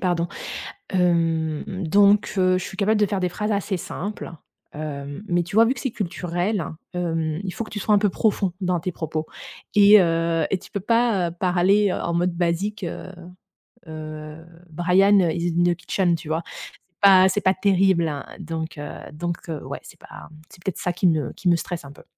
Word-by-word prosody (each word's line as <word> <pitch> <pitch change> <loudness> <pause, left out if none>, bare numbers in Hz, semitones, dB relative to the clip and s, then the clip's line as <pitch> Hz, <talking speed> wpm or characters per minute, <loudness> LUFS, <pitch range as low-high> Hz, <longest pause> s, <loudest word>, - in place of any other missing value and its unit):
pardon. 175 -2 0 0.6
Hem 170 0 0
donc 200 +4 +4
heu, 185 0 +3
je 185 - -5
suis - - -8
capable 210 +1 +2
de 210 - +4
faire 195 0 -2
des 180 - +1
phrases 210 +4 -2
assez 200 -1 -1
simples. 200 +2 -6 0.4
Hem 145 0 -6
mais 175 0 +2
tu 175 - -9
vois, 225 - +8
vu 250 - +1
que 245 - -8
c'est 265 - -2
culturel, 180 -1 -2 0.3
hem, 165 -2 -1
il 185 - -3
faut - - -3
que - - -13
tu 210 - -5
sois 210 +1 +2
un - - +6
peu 205 0 +2
profond 195 -1 0
dans 180 -2 0
tes 185 - -3
propos 160 -1 -4 0.5
et 205 0 +8
heu, 165 -2 +1
et 195 - +1
tu 190 - -15
peux 200 - -2
pas, 225 -4 +2
heu, 170 - -8
parler, 185 +3 +3
heu, - - -1
en 170 - -2
mode 175 +1 +1
basique, 180 +4 -1
heu 175 +2 -6 0.7
heu: 155 0 -8 0.3
«Brian 185 +5 +4
is 170 -1 0
in 175 - +4
the 175 0 +3
kitchen», 175 +1 0
tu 155 -1 -10
vois? 160 +2 -1 0.5
C'est 175 - -52
pas 190 -2 +7
c'est 205 +2 0
pas 190 - +3
terrible, 190 -3 +3
hein. 145 -2 -5
Donc 160 -1 -5
heu 145 0 -6 0.2
donc 170 +3 -5
heu, 155 -3 -5
ouais, - - -6
c'est - - -14
pas, - - -12
mmh, 155 0 -16
c'est 175 - -16
peut-être 190 -4 -3
ça 180 - -1
qui 180 +1 0
ne 160 -3 +1
qui 185 - -2
me 170 - +5
stresse 170 -3 -5
un 140 - -10
peu. - - -16
175 Hz, 210 wpm, -23 LUFS, 165-195 Hz, 0.7 s, vois